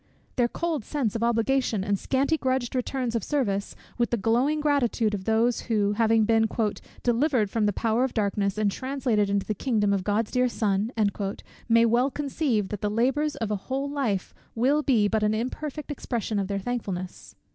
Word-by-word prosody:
Their 245 -2 +3
cold 320 0 -2
sense 250 -4 -2
of 225 - -2
obligation, 235 -2 +1
and 200 -1 0
scanty 275 +4 +1
grudged 260 -4 -1
returns 255 -1 -2
of 225 - -1
service, 205 -9 -1 0.2
with 240 - +2
the 240 - 0
glowing 240 +8 +1
gratitude 255 -7 +1
of 190 -2 -4
those 225 +2 +2
who, 205 -3 +2
having 225 0 +3
been 225 0 +3 0.6
"delivered 240 -3 +2
from 220 -2 +1
the - - +2
power 225 +4 +1
of 260 - -2
darkness, 200 -2 0
and 210 -2 +2
translated 255 -5 0
into 200 -1 0
the 215 - -1
kingdom 210 -2 +1
of 195 -2 0
God's 210 +2 0
dear 250 -1 +2
Son," 210 -1 0 0.8
may 230 0 +5
well 240 +4 +3
conceive 275 -8 -1
that 210 - -5
the 210 - 0
labours 270 +8 +1
of 220 -2 -3
a - - +1
whole 270 +2 -1
life 260 -10 -2 0.2
will 270 +6 +3
be 240 -8 +3
but 220 +1 0
an 210 0 +2
imperfect 290 +6 -4
expression 230 -6 -2
of 195 - -1
their 200 0 -2
thankfulness. 195 -4 -5
230 Hz, 185 wpm, -26 LUFS, 210-260 Hz, 0.8 s, may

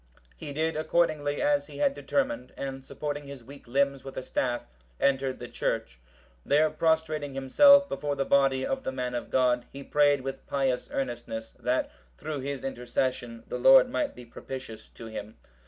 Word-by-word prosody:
He 145 - -8
did 160 +3 -1
accordingly 155 -2 +1
as 290 -1 +2
he - - -11
had 285 -1 +2
determined, 280 0 -2
and 135 -1 -5
supporting 145 +1 -5
his 140 -3 -9
weak 140 +1 -13
limbs 140 +2 +1
with 135 0 -9
a - - -3
staff, 120 -1 -1 0.4
entered 135 -1 +1
the 120 - -7
church. - - -3 0.4
There 155 +2 +3
prostrating 155 -3 0
himself 280 - +6
before 145 - -2
the 135 - -1
body 135 -1 +3
of 270 0 -2
the - - -2
man 125 -1 -3
of 120 - -4
God, 125 -2 +2
he 140 0 -8
prayed 145 -1 +3
with 135 0 -6
pious 135 -3 0
earnestness, 120 -3 -4
that, 125 +1 -1 0.3
through 150 -2 -4
his 140 0 -4
intercession, 125 -2 -2
the - - -4
Lord - - +7
might 300 - -1
be 125 - -11
propitious 120 -2 -8
to 115 - -11
him. 110 -1 -7
135 Hz, 170 wpm, -28 LUFS, 125-155 Hz, 0.4 s, Lord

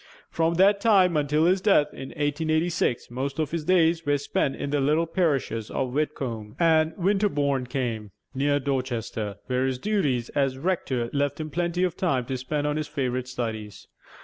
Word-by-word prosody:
From 165 +1 +1
that 200 +3 +4
time 190 -6 +4
until 150 +1 +2
his 185 +2 +3
death 150 -8 +3
in 135 - -8
1886, 155 -3 -1
most 135 +4 -3
of 155 -2 -1
his 165 -2 -3
days 165 -2 +3
were 145 -1 +2
spent 140 -1 -1
in 140 - -4
the 145 -1 +1
little 155 +4 +2
parishes 140 - -1
of 130 -2 -2
Whitcombe 130 -8 -3
and 160 -1 +3
Winterbourne 160 -9 +1
Came, 120 -5 -3 0.2
near 145 +2 +1
Dorchester, 120 -6 -3
where 130 +1 0
his 130 -1 -1
duties 140 - 0
as 135 -2 0
rector 135 -7 -1
left 145 +1 0
him 155 -1 -5
plenty 175 +2 0
of 180 -3 0
time 135 -9 0
to 130 +1 -3
spend 145 +3 -2
on 150 0 0
his 155 -1 -2
favorite 130 -4 -2
studies. 110 -5 -5
145 Hz, 175 wpm, -26 LUFS, 130-165 Hz, 0.2 s, that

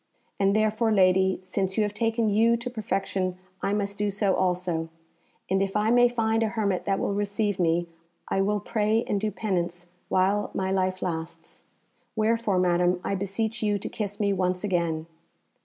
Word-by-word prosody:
And 195 0 +3
therefore, 215 +1 +2
lady, 190 -2 +3
since 190 0 -2
you 215 - +4
have 210 0 -2
taken 225 +1 0
you 225 +3 +3
to 240 +2 -5
perfection, 195 -4 -2 0.2
I - - 0
must 200 -1 -2
do 210 0 +1
so 200 -1 +1
also, 180 -3 -1 0.6
and 190 +1 +1
if 195 0 -1
I 215 +2 +2
may 245 0 +6
find 225 -2 0
a 225 - +2
hermit 210 -4 -1
that 195 -1 +1
will 200 - -1
receive 205 0 -1
me 170 0 +2 0.4
I 195 - +1
will 205 +1 +1
pray 215 +2 +1
and 200 - -1
do 215 - 0
penance 175 -4 -3 0.2
while 195 +3 +2
my 190 0 -1
life 185 -1 0
lasts. 165 -2 -5 0.5
Wherefore, 220 -2 +1
Madam, 180 0 +2
I - - -1
beseech 205 +4 -2
you 210 -1 +1
to 200 - -6
kiss 205 -2 -4
me 200 -1 +2
once 180 0 -1
again." 170 -5 0
200 Hz, 175 wpm, -26 LUFS, 185-215 Hz, 0.6 s, may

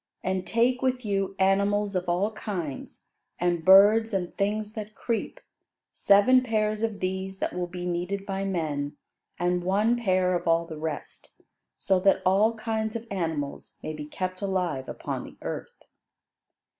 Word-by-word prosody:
And 185 0 -2
take 245 +2 +2
with 255 -2 0
you 195 -1 -1
animals 200 +1 +2
of 180 -1 -1
all 185 +5 +1
kinds, 180 - -6 0.3
and 175 -2 0
birds, 205 +4 +6
and 180 -2 -2
things 210 +1 -1
that 215 -1 -7
creep; 230 -2 -3 0.5
seven 205 +6 +5
pairs 215 -3 0
of 225 -3 -2
these 190 +1 -3
that - - -2
will 180 0 -2
be 175 0 -6
needed 180 +3 -2
by 195 -1 -3
men, 150 -6 -2 0.4
and 175 0 0
one 205 +6 +2
pair 185 -5 +1
of 175 -1 -2
all 165 0 +3
the 160 -2 -8
rest, 155 -2 -6 0.4
so 190 -1 +2
that 195 +1 +3
all 205 +5 +4
kinds 220 0 -2
of 230 0 -4
animals 160 -7 -3
may 155 - -4
be 150 -1 -6
kept 185 +5 -4
alive 180 -9 -1
upon - - -4
the - - -12
earth." - - -6
195 Hz, 155 wpm, -27 LUFS, 175-215 Hz, 0.5 s, birds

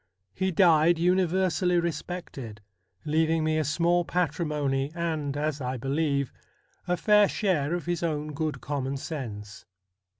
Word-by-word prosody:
He 190 0 0
died 170 -2 +4
universally 180 0 +2
respected, 160 -9 -5 0.5
leaving 160 +1 +2
me 155 0 +1
a - - +1
small 170 +4 +2
patrimony, 150 -5 -1
and, 155 -4 -2
as 150 -1 -2
I 125 0 -2
believe, 140 +1 -1 0.5
a 180 0 +1
fair 210 0 +5
share 170 -6 0
of 175 - -5
his 175 -1 -1
own 150 -2 -2
good 150 -3 -3
common 135 0 -3
sense. 110 -8 -7
155 Hz, 130 wpm, -27 LUFS, 140-175 Hz, 0.5 s, fair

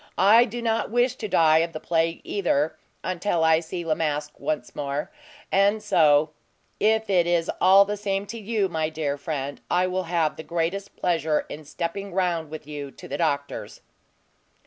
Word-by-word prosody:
I 220 +5 +6
do 240 0 -6
not 225 -1 0
wish 245 +2 +2
to 215 - -4
die 160 -4 +4
of 165 +1 -1
the 155 - -5
plague, 165 0 0
either, 160 -6 0 0.3
until 175 -1 -1
I 160 0 +5
see 170 +1 -6
La 160 - +2
Masque 150 -2 -3
once 145 -3 -3
more; 145 - -3 0.4
and 200 +2 +3
so 150 -1 +4 0.5
if 220 +1 +2
it 180 -3 +3
is 170 -1 +1
all 195 +2 +7
the 205 +1 -2
same 195 -1 -2
to 225 +3 -7
you, 215 -2 0
my 160 -3 -1
dear 155 -3 -2
friend, 140 -1 -5
I 180 +1 +2
will 185 0 -2
have 165 -3 0
the 160 - -7
greatest 170 +5 -3
pleasure 160 -3 0
in 155 +1 -8
stepping 175 +5 -5
round 175 -4 0
with 155 -1 -8
you 145 -1 -6
to - - -12
the 140 - -5
doctor's." 145 -4 -2
170 Hz, 180 wpm, -25 LUFS, 155-195 Hz, 0.5 s, all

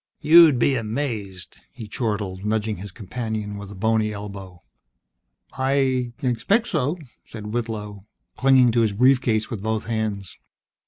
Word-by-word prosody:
"You'll 165 -1 +7
be 130 +3 +2
amazed!" 110 -6 -4
he 115 -3 -9
chortled, 105 -4 -3
nudging 110 0 -1
his 100 +2 -8
companion 110 0 -5
with 100 -1 -8
a 100 - -10
bony 110 +2 +1
elbow. 100 -4 -9 0.9
"I 130 -2 0
I - - -1
expect 165 - +1
so," 155 0 0 0.3
said 105 -1 -8
Whitlow, 105 -4 -5 0.3
clinging 130 -2 +5
to 115 +1 +2
his 110 -3 +1
brief 125 +4 +4
case 110 -1 0
with 110 -5 -4
both 110 +1 -1
hands. 110 -4 -3
110 Hz, 145 wpm, -23 LUFS, 105-125 Hz, 0.9 s, You'll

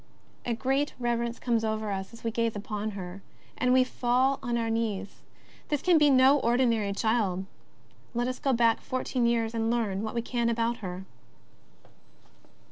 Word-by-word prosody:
A 235 - 0
great 270 +4 0
reverence 235 -1 -1
comes 230 -2 0
over 220 -1 -1
us 190 -1 -4
as 230 - -14
we 230 - -1
gaze 230 0 0
upon 210 +1 -4
her, 185 +1 -7 0.3
and 250 - 0
v^e 255 0 +5
fall 255 +2 +1
on 240 -3 -1
our 230 -1 -1
knees. 210 -3 -3 0.5
This 295 -1 -1
can 350 -3 +5
be 295 -1 +5
no 265 +1 +6
ordinary 235 -4 +2
child. 200 -3 0 0.7
Let 240 +1 0
us 255 - -3
go 275 - +1
back 230 -2 +3
four 255 0 -3
teen 245 -3 0
years 230 -1 +1
and 225 -1 0
learn 220 -5 0
what 220 +2 -4
we 235 - -1
can 235 -1 0
about 235 +1 0
her. 185 -1 -6
235 Hz, 175 wpm, -28 LUFS, 220-250 Hz, 0.7 s, no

